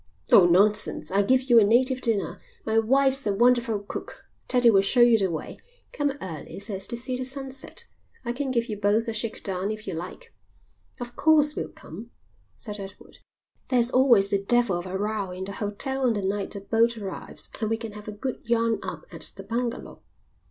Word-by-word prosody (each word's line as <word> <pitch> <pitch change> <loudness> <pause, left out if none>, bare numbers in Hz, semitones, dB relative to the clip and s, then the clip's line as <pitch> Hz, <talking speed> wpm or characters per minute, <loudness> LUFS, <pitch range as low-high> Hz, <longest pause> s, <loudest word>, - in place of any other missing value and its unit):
"Oh, 180 -3 +8
nonsense. 185 -3 +2
I'll 195 +1 +3
give 260 +5 +3
you 240 -3 +6
a - - +5
native 255 +5 +3
dinner. 225 -5 -1 0.2
My 220 0 +2
wife's 270 +2 +3
a 205 - +1
wonderful 235 -1 +2
cook. 205 - -8 0.2
Teddie 245 -2 +5
will 195 -2 +5
show 240 +5 +3
you 240 -1 +7
the 190 -2 +1
way. 160 -2 -6 0.4
Come 290 -2 0
early 165 - -7
so 200 +2 -6
as 195 0 -2
to 235 - -5
see 250 +2 -3
the 255 - -3
sunset. 270 - -5 0.4
I 240 - -1
can 270 +2 -3
give 235 -2 0
you 210 -3 -5
both 210 +3 +1
a 230 - -2
shake 220 +1 -3
down 190 0 -2
if 215 0 -5
you 190 - -4
like." 185 - -8 0.7
"Of 245 0 -7
course 300 -2 +3
we'll - - -4
come," 215 +9 -11 0.5
said 210 -3 -7
Edward. 195 -1 -11 0.5
"There's 245 -1 +2
always 240 -7 +5
the 200 -1 +1
devil 240 -2 +2
of 175 - -7
a 185 +1 -3
row 205 -1 -2
in 180 +1 -6
the 200 - -6
hotel 255 +7 -2
on 235 - +2
the 205 -2 -3
night 200 +1 -2
a 200 - -6
boat 230 +3 +1
arrives 195 -3 -3
and 215 -2 -1
we 225 - 0
can 225 -1 -6
have 210 0 -11
a - - -4
good 245 +5 -5
yarn 230 -1 +1
up - - -7
at - - -3
the 195 - -9
bungalow." 235 +3 -4
225 Hz, 210 wpm, -25 LUFS, 200-250 Hz, 0.7 s, Oh